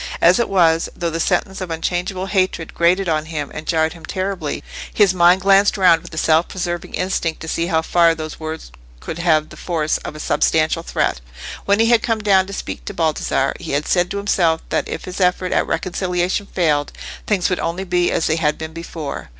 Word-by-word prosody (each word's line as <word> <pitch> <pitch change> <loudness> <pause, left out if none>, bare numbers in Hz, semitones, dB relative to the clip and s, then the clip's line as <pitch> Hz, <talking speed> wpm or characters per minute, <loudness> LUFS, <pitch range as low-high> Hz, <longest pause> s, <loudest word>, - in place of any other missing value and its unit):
As 180 +5 +5
it 235 - 0
was, 165 -4 +3
though 170 -1 -2
the 165 - -3
sentence 190 +4 0
of 185 - -4
unchangeable 180 +3 -2
hatred 185 -4 -1
grated 180 +3 +2
on 155 -2 0
him 150 -3 -4
and 155 - -7
jarred 160 -1 +1
him 165 -2 -14
terribly, 185 -3 -3 0.3
his 200 -3 +4
mind 180 +1 +5
glanced 195 +2 +4
round 180 -4 +5
with 175 - -12
a 155 - -9
self 160 +1 +3
preserving 175 -2 -4
instinct 180 -3 -1
to 160 - -7
see 165 +1 -1
how 160 -2 +1
far 170 -1 +3
those 155 -1 -7
words 155 - -6 0.3
could 160 - -6
have 155 -3 +2
the - - -13
force 160 -3 -1
of - - -8
a - - -8
substantial 160 +1 +1
threat. - - -1 0.4
When 200 +1 +2
he 230 +1 +4
had 235 -1 +5
come 225 -2 0
down 190 -2 +4
to - - -8
speak - - -6
to 205 - -6
Baldassarre, 155 -5 0
he 165 -5 -5
had 145 +2 0
said 175 -1 +2
to 200 - -4
himself 175 -5 +1
that - - -1
if - - -5
his 185 +1 -6
effort 180 0 +1
at - - +1
reconciliation 180 +2 -1
failed, 150 -7 0 0.4
things 195 -3 +1
would 180 - 0
only 175 +3 -2
be 180 -1 +1
as 160 - 0
they 160 - +1
had 150 -2 +1
been 160 0 -7
before. 160 - -6
175 Hz, 215 wpm, -19 LUFS, 160-185 Hz, 0.4 s, As